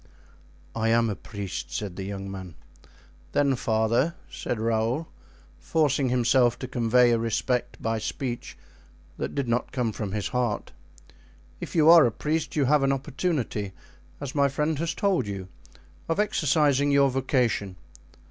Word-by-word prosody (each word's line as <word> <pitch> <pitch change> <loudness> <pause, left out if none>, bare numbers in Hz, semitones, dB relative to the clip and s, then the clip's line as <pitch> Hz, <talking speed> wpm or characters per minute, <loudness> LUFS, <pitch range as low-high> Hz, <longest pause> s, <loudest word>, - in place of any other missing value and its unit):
"I 115 0 +1
am 115 -1 +3
a - - -3
priest," 100 -1 -6
said 100 -4 -4
the 95 - -6
young 95 0 -5
man. 95 -4 -8 0.8
"Then, 140 -2 +3
father," 115 +7 +1 0.2
said 120 - -3
Raoul, 115 +7 0 0.5
forcing 145 -4 +1
himself 120 0 +3
to 130 - -6
convey 120 0 +3
a 115 - +2
respect 115 +2 -1
by 115 0 -1
speech 120 +2 -4 0.6
that - - -3
did 140 -3 -1
not 120 +1 -1
come 125 -4 -1
from 105 -2 -5
his 105 -2 -2
heart, 125 -4 -1 0.9
"if - - -7
you 155 -2 +4
are 165 -5 +9
a - - -1
priest 155 +7 -2
you 145 -3 +2
have 150 +2 +4
an 135 0 +2
opportunity, 135 - -2 0.5
as 140 -2 -5
my 140 -1 +3
friend 150 +2 -1
has 165 0 -2
told 190 - +1
you, 95 -2 -6 0.6
of 165 - 0
exercising 145 -7 +2
your 140 -1 +4
vocation. 125 -7 0
125 Hz, 150 wpm, -26 LUFS, 110-145 Hz, 0.9 s, are